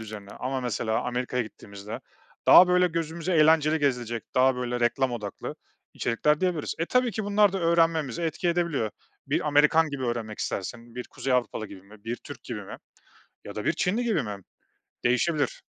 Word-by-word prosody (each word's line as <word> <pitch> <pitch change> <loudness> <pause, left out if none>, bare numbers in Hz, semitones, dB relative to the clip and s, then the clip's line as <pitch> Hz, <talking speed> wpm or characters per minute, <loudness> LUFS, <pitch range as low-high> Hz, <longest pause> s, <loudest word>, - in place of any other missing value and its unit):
üzerine 105 -2 -8
ama 130 +1 -3
mesela 115 -2 -1
Amerika'ya 125 0 -1
gittiğimizde 105 -1 -9 0.5
daha 180 - +9
böyle 180 0 +4
gözümüze 165 +1 -3
eğlenceli 155 0 +5
gezilecek, 120 -5 -1
daha 130 0 +4
böyle 125 -1 -2
reklam 125 +2 +1
odaklı 105 -4 -5 0.4
içerikler 150 +7 +1
diyebiliriz. 180 -5 -1
E, 165 - -1
tabii 250 -1 +2
ki 215 +1 -3
bunlar 205 -1 +4
da 195 - -1
öğrenmemize 165 -4 +2
etki 165 +3 -1
edebiliyor. 170 -10 0 0.4
Bir - - 0
Amerikan 150 +2 +4
gibi 135 -2 -4
öğrenmek 115 -3 -3
istersin, 115 +4 -5
bir 125 0 -5
Kuzey 135 - -3
Avrupalı 120 -3 0
gibi 95 -2 -12
mi, 100 +2 -17
bir 115 +2 -3
Türk - - -11
gibi - - -5
mi - - -8 0.7
ya - - -8
da - - -4
bir - - +2
Çinli 215 +7 0
gibi 215 -10 +1
mi? 105 -3 -5 0.7
Değişebilir. 145 +5 +1
130 Hz, 170 wpm, -27 LUFS, 115-165 Hz, 0.7 s, daha